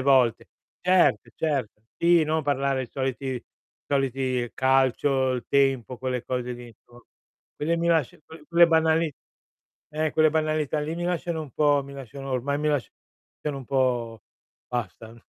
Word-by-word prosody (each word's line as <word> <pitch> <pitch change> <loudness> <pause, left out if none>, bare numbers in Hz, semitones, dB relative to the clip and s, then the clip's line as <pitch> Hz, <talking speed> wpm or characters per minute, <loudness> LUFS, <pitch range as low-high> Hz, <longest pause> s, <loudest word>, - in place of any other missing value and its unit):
volte. 130 -4 +3 0.3
Cert 180 0 +3
cert 140 -9 -1 0.3
Sì, 170 -1 +5
no 155 +1 0
parlare 140 -2 0
i - - -6
soliti 135 0 -3
i 125 - -6 0.4
soliti 130 -3 0
calcio, 130 0 +2
il 125 -2 -3
tempo, 135 -3 +1
quelle 125 -2 -3
cose 125 -1 -3
lì, 120 0 -9
inso 120 +1 -19 0.5
Quelle 165 +3 -1
mi 170 - -1
lascia 160 -6 +1
que 160 -1 -13
quelle 170 0 +6
banali 160 -1 +2 0.8
eh, 155 0 0
quelle 155 0 +4
banalità 155 -1 0
lì 155 +2 -3
mi 175 - -3
lasciano 175 -2 -2
un 150 - -10
po' 145 0 +3
mi 140 - -11
lasciano 135 +1 -8
ormai 135 +3 -1
mi 150 - -2
lasciano 145 -6 -1 0.7
un 135 - -9
po' 120 -4 0 0.5
basta. 115 -1 -5
135 Hz, 155 wpm, -25 LUFS, 125-155 Hz, 0.8 s, quelle